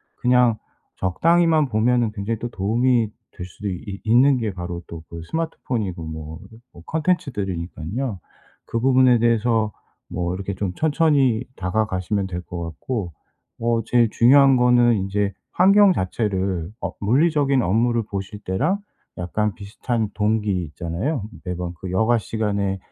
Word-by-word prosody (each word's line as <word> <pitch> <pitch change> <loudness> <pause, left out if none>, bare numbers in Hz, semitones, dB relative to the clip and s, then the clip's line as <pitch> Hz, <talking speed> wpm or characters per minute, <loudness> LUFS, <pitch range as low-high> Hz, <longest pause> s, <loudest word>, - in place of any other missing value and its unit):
그냥 125 -2 +3 0.4
적당히만 160 - +3
보면은 120 +1 +2
굉장히 105 +1 -3
또 120 - -4
도움이 115 +3 +1 0.2
될 90 - -8
수도 100 +3 -6
있 100 +2 -6
있는 125 +5 +4
게 110 -4 -2
바로 90 -1 -5
또 80 -1 -9
그 85 0 -8
스마트폰이고 115 - -3
뭐 80 0 -7 0.3
뭐 85 - -14
콘텐츠들이니깐요. 105 - -2 0.5
그 115 - -2
부분에 130 -1 +4
대해서 115 -1 +2 0.4
뭐 90 0 -2
이렇게 100 +1 -4
좀 95 -1 -3
천천히 145 - +2
다가가시면 95 0 -1
될 90 -1 -5
것 85 -1 -7
같고. 85 +3 -4 0.5
어 115 0 +1
제일 120 -1 +3
중요한 135 +3 +6
거는 120 -5 +3
이제 100 0 -1 0.2
환경 195 +2 +6
자체를 95 - -1
어 - - -3
물리적인 140 +3 +2
업무를 115 +5 +1
보실 100 0 -6
때랑 140 - 0 0.4
약간 105 +4 -1
비슷한 110 +2 -3
동기 105 -3 0
있잖아요. 85 - -3 0.2
'매번 90 -1 -4
그 95 - -6
여가 110 +5 +2
시간에 100 -3 -1
110 Hz, 295 characters per minute, -22 LUFS, 95-125 Hz, 0.5 s, 중요한